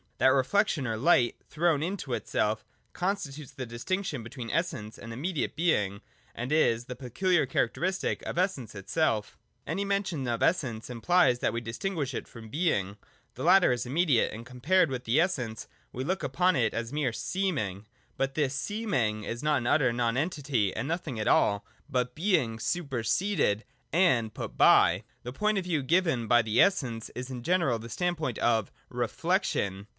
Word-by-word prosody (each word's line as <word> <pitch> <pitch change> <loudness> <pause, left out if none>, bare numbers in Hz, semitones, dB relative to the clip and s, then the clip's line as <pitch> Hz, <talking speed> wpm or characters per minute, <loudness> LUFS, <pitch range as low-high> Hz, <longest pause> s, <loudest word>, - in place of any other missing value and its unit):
That - - +4
reflection, 140 +3 +2
or 110 -2 -2
light 125 -2 +3
thrown 160 -2 +1
into 165 -6 -3
itself, 110 -2 -1 0.3
constitutes 155 -7 -3
the 130 - -5
distinction 145 +5 -3
between 115 +1 -7
Essence 125 -10 -2
and 115 - -8
immediate 150 +6 -2
Being, 105 - +1 0.3
and 125 +4 -4
is 120 -7 +3
the 125 - -6
peculiar 140 +6 +1
characteristic 180 +10 -1
of - - -5
Essence 175 - -1
itself 105 +1 -1 0.3
Any 180 +6 -2
mention 190 -9 -1
of 120 -1 -1
Essence 125 -11 0
implies 125 0 +3
that - - 0
we 115 - -2
distinguish 140 - -3
it - - -5
from 115 -2 -11
Being: 105 - 0 0.4
the - - -7
latter 180 0 +6
is 120 -3 -1
immediate, 145 -3 +2
and, 115 +2 -8
compared 150 +8 +2
with 125 -1 -4
the 120 +7 +3
Essence, 125 - -1 0.2
we 130 - -4
look 185 +7 -1
upon 180 +7 +2
it 115 -5 +1
as 115 +2 -3
mere 145 -5 0
seeming. 125 - -2 0.3
But 135 0 -1
this 145 -3 +1
seem 210 +9 -3
ing 110 -4 0
is 120 +3 -4
not 150 -1 +2
an 120 -2 -2
utter 130 -2 +3
nonentity 125 - 0
and 115 +5 -3
nothing 160 -7 -3
at 105 - -2
all, 100 0 +3 0.2
but 125 -2 -1
Being 155 - +1
superseded 135 - 0 0.3
and 130 - +3
put - - -6
by. - - +5 0.2
The 125 +1 -6
point 210 +5 +1
of - - -4
view 165 -5 0
given 155 -5 +1
by 120 +1 +5
the 110 +1 +3
Essence 125 - +1
is 125 +1 -5
in 125 -2 -5
general 170 -4 +2
the 115 +1 -9
standpoint 160 -6 -2
of 110 -4 +1
' - - -39
Reflection.' 100 +1 -1
130 Hz, 170 wpm, -29 LUFS, 115-175 Hz, 0.4 s, latter